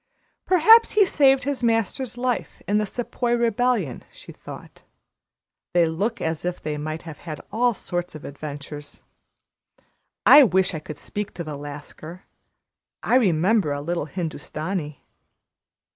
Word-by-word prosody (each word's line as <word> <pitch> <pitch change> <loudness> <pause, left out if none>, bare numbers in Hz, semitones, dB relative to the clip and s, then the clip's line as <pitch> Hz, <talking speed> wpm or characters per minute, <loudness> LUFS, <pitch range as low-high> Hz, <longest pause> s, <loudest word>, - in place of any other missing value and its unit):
"Perhaps 445 +6 +6
he 420 -1 +5
saved 270 -6 +4
his 280 -1 -2
master's 230 +2 0
life 250 0 -2
in 210 +1 +2
the 210 - -1
Sepoy 240 +2 -2
rebellion," 235 - 0
she - - -13
thought. - - -12 0.9
"They 175 -1 +5
look 195 +8 -2
as 160 -1 -3
if 180 0 -3
they 150 -1 -4
might 155 +2 -5
have 160 -3 -9
had 155 -3 -7
all 240 +2 +2
sorts 175 -2 -4
of 155 - -9
adventures. 145 0 -8 1.2
I 290 - +10
wish 190 -5 +2
I 160 - -3
could 155 -1 -9
speak 205 +7 -6
to 170 - -4
the 155 -2 -6
Lascar. 145 +4 -9 0.8
I - - 0
remember 190 - +3
a 145 - -3
little 170 -1 -2
Hindustani." 155 -1 -5
180 Hz, 140 wpm, -23 LUFS, 155-240 Hz, 1.2 s, I